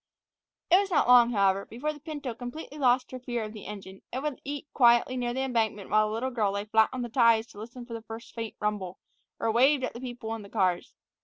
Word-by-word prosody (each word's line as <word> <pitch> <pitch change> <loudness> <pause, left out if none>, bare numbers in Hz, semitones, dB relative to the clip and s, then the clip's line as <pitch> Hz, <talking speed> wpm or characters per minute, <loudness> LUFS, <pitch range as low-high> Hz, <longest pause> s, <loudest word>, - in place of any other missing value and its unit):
It 365 - +8
was 400 -1 -1
not 335 - +2
long, 245 -1 +7
however, 195 -3 +2
before 290 +7 -3
the 295 - -13
pinto 290 -4 -5
completely 255 +5 -8
lost 250 -1 +2
her 255 - -6
fear 240 -2 -3
of 215 0 -7
the 215 - -9
engine, 195 -2 -9
and 260 +3 -4
would 300 -3 -3
eat 285 +1 -5
quietly 240 0 +4
near 245 -1 -1
the 260 +2 -2
embankment 225 -6 -1
while 215 0 +4
the 215 - -4
little 260 +3 -2
girl 215 -5 0
lay 200 0 -3
flat 220 +1 +3
on 255 -1 -4
the - - -3
ties 230 -2 +4
to 205 - -13
listen 240 +3 -9
for 235 -1 -7
a 225 - -6
first 225 +1 -10
faint 225 -2 -5
rumble, 200 -3 -2 0.4
or 225 - +1
waved 260 +4 +4
at - - -2
the 235 - -9
people 240 -3 -5
in 225 - -5
the 200 - -12
cars. 180 -3 0
235 Hz, 245 wpm, -28 LUFS, 215-255 Hz, 0.4 s, It